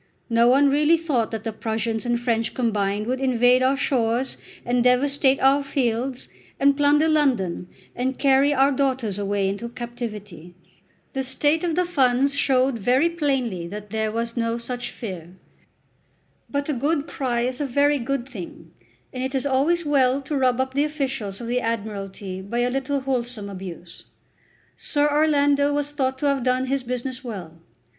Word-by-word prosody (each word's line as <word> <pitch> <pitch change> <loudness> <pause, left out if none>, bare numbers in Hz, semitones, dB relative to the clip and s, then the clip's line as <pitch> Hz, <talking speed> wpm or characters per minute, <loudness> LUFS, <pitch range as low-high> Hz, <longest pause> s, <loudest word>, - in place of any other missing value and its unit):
No 230 +1 +4
one 275 +3 +5
really 300 +3 +4
thought 285 -9 0
that 220 -1 -5
the 225 - -3
Prussians 225 +1 -2
and 240 0 +1
French 230 -2 -1
combined 210 -4 0
would 255 +3 -2
invade 250 -1 +4
our 265 +1 +2
shores 245 -1 0 0.3
and 245 0 +1
devastate 270 +2 +3
our 275 +2 +4
fields, 255 -1 -2 0.3
and 280 0 +4
plunder 295 +2 +3
London, 250 - +1 0.3
and 260 +1 -2
carry 275 +1 +4
our 275 0 +3
daughters 260 -7 -1
away 200 -1 0
into 200 +5 -3
captivity. 215 -8 -7 0.6
The 270 - -1
state 290 +5 +1
of 335 -3 0
the 360 +1 +2
funds 275 -4 +2
showed 265 -3 +2
very 255 - +3
plainly 265 - -1
that 210 +2 -8
there 220 -1 -1
was 230 +1 -3
no 230 -1 -1
such 245 +1 -5
fear. 180 -5 -8 1.1
But 285 0 -2
a 300 - 0
good 285 +3 0
cry 250 -6 -2
is 250 +3 -2
a 285 - -1
very 285 +2 +2
good 260 0 -2
thing, 175 -8 -9 0.4
and 255 - -4
it 265 +1 -3
is 265 - -1
always 295 +6 +1
well 270 -2 +3
to 295 - -3
rub 255 -2 +2
up 260 0 -1
the 285 +2 +2
officials 270 -9 -3
of 240 - -6
the 245 +2 0
Admiralty 200 -4 -4
by 235 +5 -2
a 245 +1 +1
little 270 +1 -1
wholesome 240 -6 -3
abuse. 180 -3 -9 0.7
Sir 290 -1 0
Orlando 290 -1 +3
was 290 0 -1
thought 265 -3 -1
to 290 - -3
have 280 -2 +2
done 255 +1 +1
his 270 +1 -1
business 250 +1 -4
well. 175 -9 -8
255 Hz, 170 wpm, -23 LUFS, 230-280 Hz, 1.1 s, one